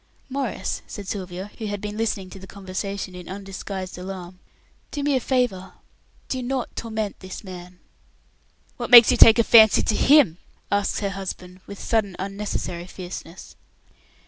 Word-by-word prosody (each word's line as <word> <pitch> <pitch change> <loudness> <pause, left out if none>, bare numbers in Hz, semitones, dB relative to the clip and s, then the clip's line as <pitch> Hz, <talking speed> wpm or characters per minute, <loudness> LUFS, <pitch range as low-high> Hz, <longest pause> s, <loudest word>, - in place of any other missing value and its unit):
"Maurice," 270 -3 -3
said 205 -2 -8
Sylvia, 190 0 -5
who 220 - -4
had 205 0 -3
been 210 +1 -5
listening 210 -4 -2
to 195 - -10
the 190 - -11
conversation 195 0 -5
in 180 -1 -10
undisguised 190 -1 -6
alarm, 180 -1 -8 0.5
"do 290 - -4
me 285 -1 +2
a - - +3
favour? 245 -8 -1 0.5
Do 260 - -3
not 255 0 -3
torment 220 -3 -4
this 185 +2 -9
man." 180 -1 -10 1.0
"What 240 - -4
makes 240 -1 +10
you 250 - +2
take 225 0 +9
a 230 - +5
fancy 220 -2 +7
to 215 - 0
him?" 260 - +5 0.3
asks 205 +1 0
her 200 -1 -1
husband, 185 -1 -7
with 200 - -9
sudden 210 -5 0
unnecessary 195 -3 -4
fierceness. 180 -2 -9
200 Hz, 155 wpm, -23 LUFS, 185-225 Hz, 1.0 s, makes